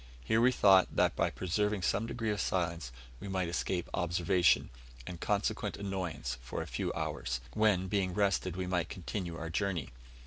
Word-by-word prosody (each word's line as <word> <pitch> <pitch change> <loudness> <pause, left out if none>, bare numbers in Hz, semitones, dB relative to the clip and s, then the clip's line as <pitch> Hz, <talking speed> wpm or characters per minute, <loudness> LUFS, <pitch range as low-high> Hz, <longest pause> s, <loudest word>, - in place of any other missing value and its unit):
Here 110 - +2
we 125 +2 +6
thought, 95 -6 +5
that - - +3
by - - +2
preserving 105 +2 -1
some 105 +5 +1
degree 115 -2 -2
of 105 - -1
silence, 85 -7 -1 0.3
we - - -7
might 95 -2 -1
escape 90 +1 -1
observation, 85 -1 +2 0.3
and 85 -2 -7
consequent 105 0 -1
annoyance, 90 -11 -3
for 60 - -4
a - - -8
few - - -2
hours, 60 +1 -2
when, 105 -4 +3
being 95 -2 0
rested, 100 -3 +1
we 95 0 -2
might 90 -3 -1
continue 90 -2 -4
our 80 0 -5
journey. 90 -6 -1
95 Hz, 170 wpm, -32 LUFS, 85-100 Hz, 0.3 s, we